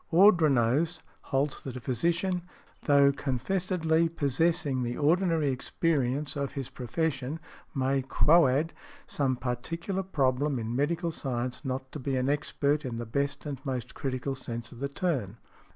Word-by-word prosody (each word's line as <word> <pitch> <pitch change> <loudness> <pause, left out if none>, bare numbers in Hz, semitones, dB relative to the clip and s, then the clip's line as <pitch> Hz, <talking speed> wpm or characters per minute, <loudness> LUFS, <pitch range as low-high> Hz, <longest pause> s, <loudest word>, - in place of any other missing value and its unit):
Ordronaux 160 - +4 0.2
holds 135 +1 -1
that 130 -2 -6
a - - -5
physician, 170 - 0 0.4
although 140 -1 +5
confessedly 160 +5 0
possessing 155 -1 +1
the 120 0 -2
ordinary 160 -1 +2
experience 140 +1 0
of 140 -1 -2
his 135 -3 -5
profession, 135 +2 -2 0.4
may 135 0 +1
quoad 150 +2 +4 0.3
some 135 -3 0
particular 165 +10 -3
problem 140 -5 +1
in 115 0 -3
medical 165 +5 0
science 125 -3 -3
not 130 +1 -4
be 135 +1 -1
an 130 +1 +1
expert 145 0 0
in 125 -4 -4
the 120 - -4
best 140 +7 -2
and 140 -3 -5
most 125 -3 -4
critical 135 0 -2
sense 120 -3 -6
of 120 - -11
the 140 +1 -2
term. 140 - -2
140 Hz, 135 wpm, -29 LUFS, 130-160 Hz, 0.4 s, although